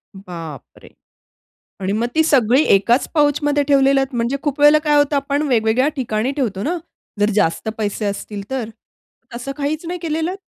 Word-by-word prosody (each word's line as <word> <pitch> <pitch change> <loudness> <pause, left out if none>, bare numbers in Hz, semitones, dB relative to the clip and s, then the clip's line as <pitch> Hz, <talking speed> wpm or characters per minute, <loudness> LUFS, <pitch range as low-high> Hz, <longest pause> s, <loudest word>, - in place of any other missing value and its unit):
बाप 165 -7 -8 0.2
रे! - - -14 0.9
आणि 190 +1 -2
मग 225 +3 0
ती 320 - +4
सगळी 260 -2 +3
एकाच 235 +6 +2
पाउचमध्ये 290 -1 +2
ठेवलेत 270 -1 +3
म्हणजे 240 +3 0
खूप 290 -2 -2
वेळेला 295 +1 +7
काय 295 -1 +3
होतं 290 0 +2
आपण 280 +1 -1
वेगवेगळ्या 235 +2 +2
ठिकाणी 230 -2 -1
ठेवतो 220 -9 -2
ना, 340 +10 -1 0.4
जर 205 +1 +3
जास्त 195 +1 0
पैसे 210 0 -2
असतील 205 0 -4
तर. 260 -4 -3 0.7
तसं 245 +3 -5
काहीच 295 +3 -3
नाही 355 +1 -4
केलेलं? 325 +2 -2
265 Hz, 160 wpm, -19 LUFS, 215-290 Hz, 0.9 s, वेळेला